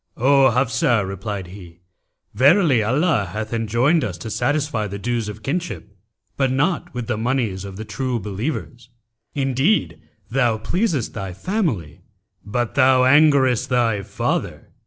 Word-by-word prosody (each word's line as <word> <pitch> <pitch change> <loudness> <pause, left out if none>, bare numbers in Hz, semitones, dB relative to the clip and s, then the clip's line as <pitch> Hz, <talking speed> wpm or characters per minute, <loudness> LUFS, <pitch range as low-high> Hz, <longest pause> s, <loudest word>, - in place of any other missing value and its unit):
'O 135 +2 +5
Hafsah!' 120 -4 +1
replied 95 0 -5
he, 90 -2 -13 0.5
'verily 140 - +4
Allah 125 - +1
hath 110 +1 -4
enjoined 115 +8 +1
us 90 -4 -4
to 110 +6 -7
satisfy 145 -7 -1
the 100 +1 -6
dues 115 0 -2
of 105 +1 -9
kinship, 140 - -4 0.4
but 135 -2 +1
not 175 +6 0
with 125 -1 -3
the 120 -2 -2
monies 115 -6 -1
of 100 -1 -8
the 110 - -6
True 130 0 -3
Believers. 115 +4 -5 0.5
Indeed, 135 - 0 0.3
thou 120 -3 +1
pleasest" 165 - -1
thy 95 -2 -5
family, 110 - -2 0.4
but 115 +3 -2
thou 130 0 +4
angerest 135 -3 +4
thy 115 -5 +1
father.' - - -3
120 Hz, 135 wpm, -21 LUFS, 105-140 Hz, 0.5 s, O